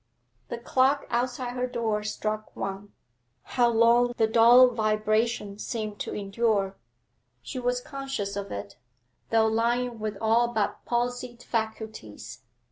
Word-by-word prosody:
The 235 - -4
clock 260 +4 +2
outside 245 +1 -1
her 250 0 -1
door 230 -4 -1
struck 215 0 -4
one; 195 +1 -5 0.5
how 240 -2 +2
long 235 +1 +4
the 225 - +4
dull 235 +3 +7
vibration 215 -1 0
seemed 215 -3 -4
to - - -4
endure. 200 -1 0 0.7
She 185 - -5
was 245 0 0
conscious 270 -8 -4
of 200 0 -5
it, 100 0 -6 0.5
though 225 -1 +4
lying 235 +2 0
with 215 -1 -3
all 225 +2 +3
but 220 -4 -2
palsied 245 0 -2
faculties. 220 - -5
225 Hz, 125 wpm, -27 LUFS, 215-245 Hz, 0.7 s, dull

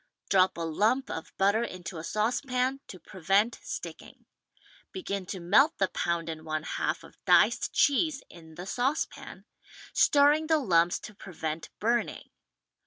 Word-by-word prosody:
Drop 190 -2 +4
a - - -4
lump 215 - 0
of 160 - -6
butter 200 +4 +3
into 180 -5 -7
a - - -7
saucepan 250 +6 -1
to 185 - -9
prevent 195 +7 0
"sticking." - - -8 0.7
Begin 200 - -4
to 190 - -5
melt 210 - +4
the 195 - +1
pound 170 -1 -2
and 160 -1 -6
one 155 -1 -3
half - - -2
of - - -17
diced - - +4
cheese 285 -1 +2
in 160 -2 -15
the 180 - -7
saucepan, 260 +9 -3 0.5
stirring 295 +2 +4
the 320 0 +4
lumps 175 - +2
to 215 - -10
prevent 160 -5 -6
burning. 235 +3 -1
200 Hz, 145 wpm, -28 LUFS, 170-260 Hz, 0.7 s, Drop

